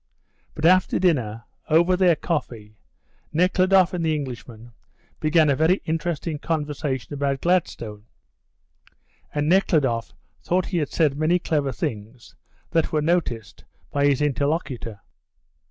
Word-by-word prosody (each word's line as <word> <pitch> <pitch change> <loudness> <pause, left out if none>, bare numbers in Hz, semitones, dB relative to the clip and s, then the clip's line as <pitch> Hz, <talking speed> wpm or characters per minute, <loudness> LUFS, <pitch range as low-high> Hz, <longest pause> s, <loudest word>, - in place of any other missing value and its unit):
But 155 - -2
after 185 +1 +4
dinner, 120 - 0 0.3
over 170 +4 +4
their 180 -2 +4
coffee, 115 -10 -4 0.6
Nekhludoff 185 +2 +3
and 175 -2 -2
the 160 -1 +1
Englishman 120 -4 -7 0.5
began 155 0 +3
a 140 - +3
very 160 +6 +3
interesting 160 -1 -2
conversation 150 -4 -3
about 140 -1 -1
Gladstone, 115 - -1 1.3
and 150 0 -1
Nekhludoff 150 -10 +2 0.3
thought 180 +1 0
he 180 - -3
had 150 - -2
said 150 -3 +1
many 160 +3 +3
clever 150 -5 -1
things 110 0 -6 0.4
which 165 -1 +1
were 150 -1 0
noticed 150 - -1 0.3
by 145 0 +2
his 145 0 +2
interlocutor. 140 - -2
150 Hz, 120 wpm, -23 LUFS, 130-170 Hz, 1.3 s, after